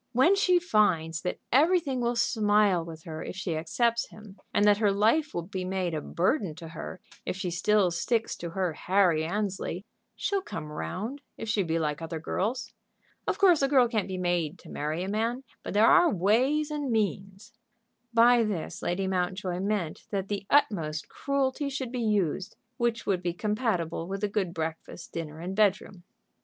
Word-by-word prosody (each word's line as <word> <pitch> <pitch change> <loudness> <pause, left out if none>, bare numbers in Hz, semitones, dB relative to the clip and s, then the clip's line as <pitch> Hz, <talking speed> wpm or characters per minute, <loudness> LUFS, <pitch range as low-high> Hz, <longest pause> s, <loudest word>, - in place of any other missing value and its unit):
When 315 +11 +5
she 370 -3 +4
finds 185 - +2
that 180 - -3
everything 295 -2 +3
will 240 0 0
smile 210 -6 +3
with 165 -1 -10
her 160 -2 -6
if - - -6
she 185 -3 -3
accepts 235 +9 0
him, 210 -2 -14
and 205 - +3
that 205 0 +5
her 210 -2 +3
life 225 +10 +2
will 170 - -1
be 185 +1 -5
made 185 -2 -2
a 155 - -2
burden 185 - 0
to 165 0 -9
her 165 +3 -7 0.2
if - - -3
she 185 -2 -3
still 190 +2 +2
sticks 225 +7 0
to 170 - -5
her 180 -1 -1
Harry 180 -3 +2
Annesley, 190 0 -3 0.3
she'll 400 -1 -1
come 155 - -7
round, 220 - -4 0.2
if 225 - -6
she 215 -2 +1
be 165 -3 0
like 150 -1 -1
other 165 0 -4
girls. 215 +9 -2 0.5
Of - - 0
course 360 -6 +5
a 275 - +4
girl 265 -3 +5
can't 220 -4 -1
be 190 -1 -4
made 175 -2 0
to 165 - -14
marry 155 +4 -2
a - - -4
man, 230 +5 -1 0.2
but - - -6
there 215 +2 +6
are 350 +5 +6
ways 260 - +2
and 295 -2 -2
means." 195 -2 -2 0.6
By 235 +1 +6
this 205 -7 -3
Lady 185 +2 -1
Mountjoy 185 -1 -1
meant 195 -5 -2
that 195 -1 -3
the 200 -1 -3
utmost 165 - +1
cruelty 280 0 -1
should 265 -3 -4
be 250 -1 -3
used 205 -3 0 0.2
which 235 -1 0
would 185 -3 +1
be 175 -1 -1
compatible 180 -5 -1
with 195 +2 -4
a - - +3
good 200 -3 -1
breakfast, 160 0 -5
dinner, 160 -2 -5
and 180 +3 -5
bedroom. 200 -2 +1
200 Hz, 185 wpm, -28 LUFS, 175-235 Hz, 0.6 s, there